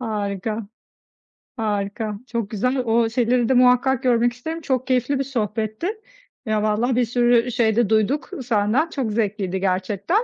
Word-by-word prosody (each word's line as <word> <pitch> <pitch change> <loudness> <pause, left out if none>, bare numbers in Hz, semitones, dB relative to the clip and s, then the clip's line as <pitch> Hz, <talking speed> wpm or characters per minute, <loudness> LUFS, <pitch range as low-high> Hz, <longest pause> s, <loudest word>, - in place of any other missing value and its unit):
Harika, 210 -1 -3 0.9
harika, 210 0 -2
çok 230 -4 -3
güzel. 250 +5 0
O 230 -2 +2
şeyleri 240 0 +1
de - - +4
muhakkak 250 +1 +4
görmek 240 -1 +3
isterim. 320 +7 -6
Çok 260 -4 -1
keyifli 255 +2 +1
bir 275 - +1
sohbetti. 220 - -3 0.6
Ya, 215 -1 0
vallahi 225 +4 +1
bir 245 - +2
sürü 240 +1 +2
şey 225 -3 +1
de 235 -3 +2
duyduk 220 +7 +1
senden. 230 +7 +1
Çok 265 -8 -3
zevkliydi 200 -3 -1
gerçekten. 195 - 0
230 Hz, 145 wpm, -22 LUFS, 210-250 Hz, 0.9 s, de